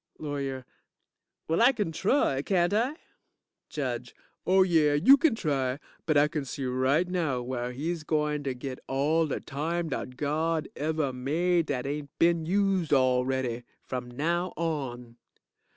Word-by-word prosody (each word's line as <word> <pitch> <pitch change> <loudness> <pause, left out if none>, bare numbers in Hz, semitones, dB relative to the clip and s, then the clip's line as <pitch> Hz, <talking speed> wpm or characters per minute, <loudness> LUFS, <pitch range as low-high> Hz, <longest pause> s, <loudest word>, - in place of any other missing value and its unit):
LAWYER 140 -3 -4 0.8
Well, 165 +5 +1
I 250 +3 +6
kin 205 -9 -2
try, 175 - +1
can't 175 +3 +1
I? 240 +8 +1 0.7
JUDGE 125 -4 -4 0.3
Oh 190 +1 +6
yeah, 160 -5 +3
you 195 - +7
kin 285 -4 +2
try, 135 -8 -1 0.3
but 155 -2 +3
I 145 +1 +5
kin 150 -2 -3
see 135 0 -5
right 130 +7 +1
now 160 -9 -1
where 125 0 -3
he's 155 +5 -3
gointer 150 -3 -1
git 130 +1 -6
all 155 +4 +1
de 145 - -2
time 165 +4 -3
dat 125 -2 -5
God 155 +2 0
ever 155 -2 -1
made 165 +6 +1
dat 130 -3 -2
ain't 145 +1 -4
been 170 -1 +2
used 190 -3 +1
already. 130 -2 +1 0.2
From 125 -1 -5
now 170 +8 -1
on. 130 -8 -3
150 Hz, 145 wpm, -28 LUFS, 130-170 Hz, 0.8 s, you